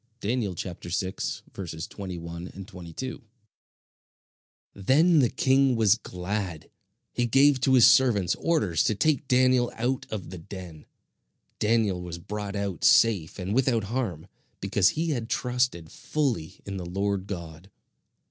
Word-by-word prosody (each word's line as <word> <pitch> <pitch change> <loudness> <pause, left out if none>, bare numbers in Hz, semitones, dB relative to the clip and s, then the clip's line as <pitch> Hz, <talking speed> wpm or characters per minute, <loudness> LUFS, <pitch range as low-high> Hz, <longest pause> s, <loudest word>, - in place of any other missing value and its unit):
(Daniel 110 -3 -1
6: 90 +1 -4 0.2
21 85 0 -6
22.)] 95 - -7 1.5
Then 150 - +4
the 125 -4 +4
king 135 -1 +3
was 110 -3 +5
glad. 95 -5 -5 0.4
He 120 -1 0
gave 135 +2 +4
to 130 0 +4
his 125 - +8
servants 120 -8 +4
orders 105 - +1
to 110 - +1
take 150 +4 +1
Daniel 125 -1 +3
out 125 +3 -2
of 95 -5 -6
the 90 - -7
den. 85 -2 -10 0.7
Daniel 105 -4 +1
was 85 -1 -6
brought 105 +3 -5
out 100 -5 -3
safe 100 -9 +4
and 95 +1 -3
without 125 -3 +2
harm, 95 -11 -2 0.3
because 95 -1 +3
he 165 +1 -1
had 120 -5 -3
trusted 125 -10 -1
fully 115 - -2
in 100 -1 -5
the 90 - -5
Lord 100 +1 -2
God. 85 -1 -7
100 Hz, 130 wpm, -26 LUFS, 90-125 Hz, 1.5 s, his